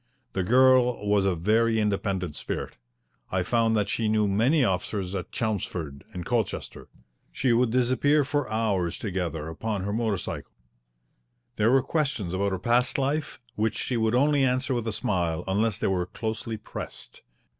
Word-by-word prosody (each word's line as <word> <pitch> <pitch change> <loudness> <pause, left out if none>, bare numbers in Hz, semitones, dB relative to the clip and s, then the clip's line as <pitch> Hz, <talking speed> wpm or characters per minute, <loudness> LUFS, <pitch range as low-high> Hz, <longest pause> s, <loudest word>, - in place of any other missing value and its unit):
The 95 - 0
girl 125 +1 +4
was 100 -1 +3
of 95 - +3
a - - -3
very 110 +6 +2
independent 100 -5 -1
spirit. - - -5 0.6
I 95 -1 +1
found 115 +2 +2
that 105 -1 +1
she 110 +1 0
knew 105 -1 +2
many 120 +10 +3
officers 95 -2 -1
at 95 -1 -4
Chelmsford 90 -10 -3
and 90 - -6
Colchester. 120 -3 -2 0.4
She 125 -3 +1
would 120 +1 +3
disappear 130 +5 +3
for 145 -1 -1
hours 105 -6 0
together 90 -6 -3
upon 100 +4 -3
her 100 +1 -2
motor 110 -3 0
cycle. - - -6 1.0
There 105 +1 +3
were 130 +1 +4
questions 140 - -1
about 100 +1 0
her 95 - -1
past 120 +5 +1
life 140 +2 -1
which 110 0 -1
she 125 - -2
would 110 0 +1
only 145 +2 +3
answer 130 +1 +1
with 120 -2 -2
a - - 0
smile 90 -5 -1
unless 105 +2 +1
they - - -2
were 90 -2 0
closely 110 +1 -4
pressed. 110 - -8
110 Hz, 165 wpm, -26 LUFS, 95-125 Hz, 1.0 s, girl